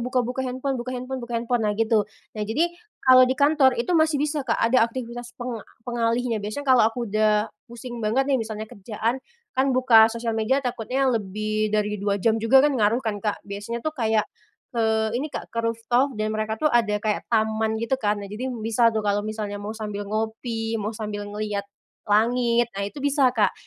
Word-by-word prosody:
buka-buka 250 +1 -1
handphone 260 0 -2
buka 255 +1 -5
handphone 255 +1 -5
buka 240 0 -6
handphone, 235 +1 0
nah 210 0 0
gitu. 220 -2 +2 0.2
Nah, 215 - -6
jadi 285 +12 0 0.3
kalau 255 -1 +8
di 260 - 0
kantor 280 -2 +4
itu 240 +10 -1
masih 315 -2 +3
bisa, 295 +1 -1
Kak, 230 - +2
ada 235 +2 +3
aktivitas 240 0 -7
peng 245 -3 -5 0.2
pengalihnya. 235 -1 0
Biasanya 215 +8 -5
kalau 260 -2 +6
aku 240 +1 -4
udah 215 +1 +1 0.2
pusing 240 0 -8
banget 230 +5 +1
nih, 265 - +2
misalnya 220 -1 -4
kerjaan, 220 +4 -3 0.3
kan 265 +1 +2
buka 230 -4 +7
sosial 230 0 -3
media 225 +4 +1
takutnya 250 +2 -1
lebih 215 0 -1
dari 210 -1 -1
2 200 0 0
jam 220 +3 +1
juga 265 +5 +5
kan 295 - +3
ngaruh 215 +3 +3
kan, 205 -2 -2
Kak, 210 0 -3
biasanya 205 +5 -6
tuh 310 - -1
kayak, 220 -6 +1 0.5
eee, 220 -2 +1
ini, 300 - -3
Kak, - - -7
ke 230 - -4
rooftop 230 +3 0
dan 215 0 -1
mereka 215 0 -2
tuh 305 +5 +1
ada 225 -3 +3
kayak 210 0 -2
taman 220 -1 +1
gitu 230 +3 -4
kan. 210 -1 +1
Nah, 205 - -6
jadi 210 +6 -5 0.2
bisa 230 +1 +3
tuh 220 -1 -1
kalau 205 0 +1
misalnya 210 -1 -4
mau 210 +2 -6
sambil 205 -2 -5
ngopi, 225 +1 -2
mau 215 +2 -4
sambil 210 -2 -5
ngelihat 205 -1 -4 0.4
langit, 235 +2 +2
nah 195 +1 -4
itu 290 - -11
bisa, 280 -2 +4
Kak, 215 -3 +3
225 Hz, 195 wpm, -24 LUFS, 215-250 Hz, 0.5 s, kalau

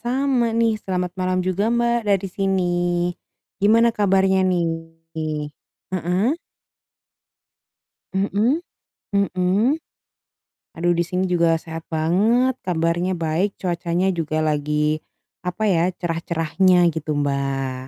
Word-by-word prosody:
sama 255 +1 +1
nih, 230 -1 +3
selamat 180 -2 -2
malam 185 0 0
juga 185 +2 0
Mbak, 235 0 +2
dari 195 -1 +2
sini. 195 -1 +1 1.0
Gimana 225 +4 +5
kabarnya 190 -1 +3
nih? 175 -2 +1 1.3
Heeh. 185 - +1 1.8
Mhm, 205 - +1 0.6
mhm. 200 - +2 1.0
Aduh 175 +1 +2
di 170 - +1
sini 180 +2 -1
juga 170 -2 +2
sehat 160 0 -7
banget, 205 +11 +2
kabarnya 175 +1 0
baik, 165 +5 -1
cuacanya 175 +1 0
juga 155 -2 -2
lagi, 150 0 0 0.4
apa 180 +4 -3
ya, 180 -3 +3
cerah-cerahnya 170 +1 +2
gitu, 155 -1 -3
Mbak. 140 -2 -1
180 Hz, 100 wpm, -22 LUFS, 165-200 Hz, 1.8 s, Gimana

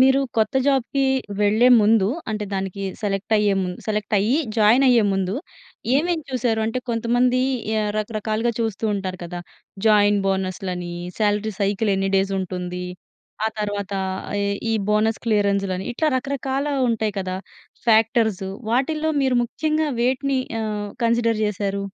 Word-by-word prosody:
మీరు 265 +1 +5 0.2
కొత్త 220 +2 +1
జాబ్‌కి 275 0 +1 0.4
వెళ్ళే 215 +4 +4
ముందు 210 -2 +4 0.2
అంటే 210 -1 -2
దానికి 195 0 -3 0.2
సెలెక్ట్ 205 +1 -2
అయ్యేముందు 195 -3 0
సెలెక్ట్ 210 0 -1
అయ్యి 225 +8 +2 0.2
జాయిన్ 225 +5 +5
అయ్యే 235 -4 +5
ముందు 195 +1 -1 0.6
ఏమేం 330 +4 +1
చూసారు? 240 -3 0
అంటే 225 +3 -1
కొంతమంది 245 +2 +2 0.6
రకరకాలుగా 215 +2 -1
చూస్తూ 225 -1 -2
ఉంటారు 185 -2 -4
కదా! 175 +1 -6 0.5
జాయిన్ 205 -1 +5
బోనస్‌లని 185 -2 -2 0.3
సాలరీ 210 0 +1
సైకిల్ 200 +2 +1
ఎన్ని 195 0 0
డేస్ 195 +1 +1
ఉంటుంది. 180 0 -4 0.6
ఆ - - +3
తరువాత 205 -1 -3 0.5
ఈ - - 0 0.3
ఈ - - +1 0.2
బోనస్ 215 +1 +2
క్లియరెన్స్‌లని 200 -3 +1
ఇట్లా 310 +6 0
రకరకాల 275 +1 -2 0.2
ఉంటాయి 220 -3 0
కదా! 185 -1 -3 0.5
ఫ్యాక్టర్స్. 220 -3 +3 0.3
వాటిల్లో 305 +6 +1
మీరు 260 -2 +2
ముఖ్యంగా 310 +5 -1
వేటిని 260 +2 +1 0.2
ఆహ్, 210 -1 -3
కన్సిడర్ 230 -1 +2
చేసారు? 200 -1 -2
215 Hz, 130 wpm, -22 LUFS, 195-240 Hz, 0.6 s, మీరు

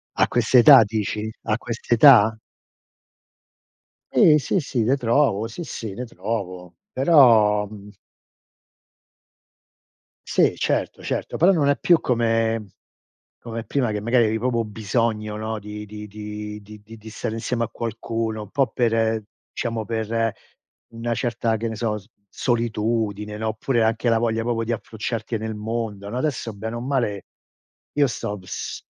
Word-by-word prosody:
A - - +3
quest'età 125 +2 +7
dici? 105 0 -3
A 110 - 0
quest'età? 115 -1 +5 1.7
Sì, 150 -2 +6
sì, 155 +6 0
sì, 125 -5 -1
le 130 +4 +3
trovo. 115 -4 +1
Sì, 120 +10 -7
sì, 115 -6 -6
le 125 +6 -5
trovo. 95 -4 -5 0.2
Però 115 -8 +5
mhmm 105 -1 -11 2.4
Sì - - +2
certo, - - -1
certo. - - -3
Però 190 +3 +5
non 145 -5 +2
è 145 - +2
più 170 -2 +4
come 115 -2 0 0.7
come 115 -1 -6
prima 125 -4 0
che 105 -1 -2
magari 115 +2 +3
eri 110 +1 0
proprio 120 0 0
bisogno, 110 0 -2
no, 110 0 -3
di 105 +1 -8
di 105 0 -8
di 105 0 -7
di 105 +1 -13 0.2
di 110 0 -12
stare 110 0 -4
insieme 115 +1 -1
a - - -5
qualcuno, 115 -1 -4
un 105 - -11
po' 135 -2 +2
per 115 -2 0 0.3
diciamo 115 -2 -3
per 115 0 -1 0.6
una 115 +1 -3
certa 115 -2 -1
che 115 +2 -3
ne 110 - -3
so, 110 -1 -2
s 100 +1 -18 0.2
solitudine, 110 -3 -1
no, 110 +1 -2
oppure, 115 +2 0
anche 115 +2 +1
la 115 -1 +4
voglia 115 -1 0
proprio 115 -1 -1
di 115 - -5
approcciarti 115 +1 -4
nel 110 0 -4
mondo, 105 -2 -4
no, 120 +4 -4
adesso 130 -5 -2
bene 110 +3 -5
o - - -4
male, 120 -6 -2 0.7
io 145 -1 +4
sto 105 -4 -4
bs 95 - -7
115 Hz, 145 wpm, -23 LUFS, 105-120 Hz, 2.4 s, quest'età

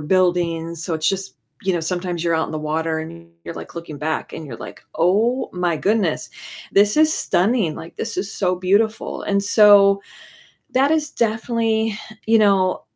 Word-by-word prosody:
buildings, 170 -1 0
so 170 - -2
it's 160 0 0
just 195 0 -3 0.3
you 190 -1 +1
know, 175 - 0
sometimes 175 0 -3
you're 170 -1 +1
out 160 0 +1
in - - -8
the 155 - -3
water, 160 +1 -2
and 165 +1 -8 0.2
you're 170 - -7
like - - -9
looking 165 -3 -7
back, 155 +2 -3
and 160 - -7
you're 120 -5 -8
like, - - -10
"Oh 215 +9 +2
my 175 -2 0
goodness, 200 -4 0 0.4
this 205 +1 +4
is 310 0 +5
stunning, 190 - +1
like 165 - -10
this - - -4
is 195 +2 -3
so 185 -2 0
beautiful," 205 +5 0
and 200 0 0
so 200 -1 +6 0.7
that 270 +3 +2
is 310 -2 +1
definitely 225 -1 0 0.3
you 225 +1 +5
know, 195 -3 +3
185 Hz, 175 wpm, -21 LUFS, 165-215 Hz, 0.7 s, so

